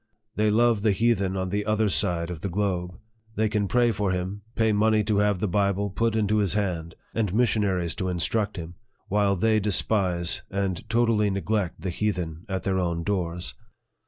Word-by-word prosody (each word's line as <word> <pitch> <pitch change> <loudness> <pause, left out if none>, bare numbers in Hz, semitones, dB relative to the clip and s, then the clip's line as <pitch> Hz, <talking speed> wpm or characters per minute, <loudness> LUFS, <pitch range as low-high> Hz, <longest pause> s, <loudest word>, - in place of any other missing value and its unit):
They 105 0 +2
love 115 0 +3
the 105 -1 +3
heathen 100 -3 +1
on 95 0 -2
the 105 +2 -1
other 105 +1 +1
side 90 -4 +1
of 80 -4 -7
the 100 - -2
globe. 90 -2 -2 0.4
They 110 +1 +2
can 105 -1 0
pray 120 +2 +3
for 100 -2 -1
him, 95 +2 -3
pay 110 -1 +2
money 110 +1 +3
to 105 -1 +1
have 105 -1 +2
the 105 - -1
Bible 100 +1 0
put 115 +3 0
into 110 -1 +1
his 100 -3 +1
hand, 85 -6 -2 0.2
and 110 -5 0
missionaries 100 -7 +1
to 95 - -2
instruct 100 +4 -1
him; 85 0 -6 0.4
while 100 0 +2
they 110 +3 +2
despise 95 -4 +1
and 100 +1 -3
totally 115 -2 +2
neglect 100 -1 -2
the 95 - -2
heathen 85 -4 -3
at 95 -1 -2
their 95 -1 0
own 85 -2 -1
doors. 90 -6 -2
100 Hz, 185 wpm, -25 LUFS, 90-105 Hz, 0.4 s, love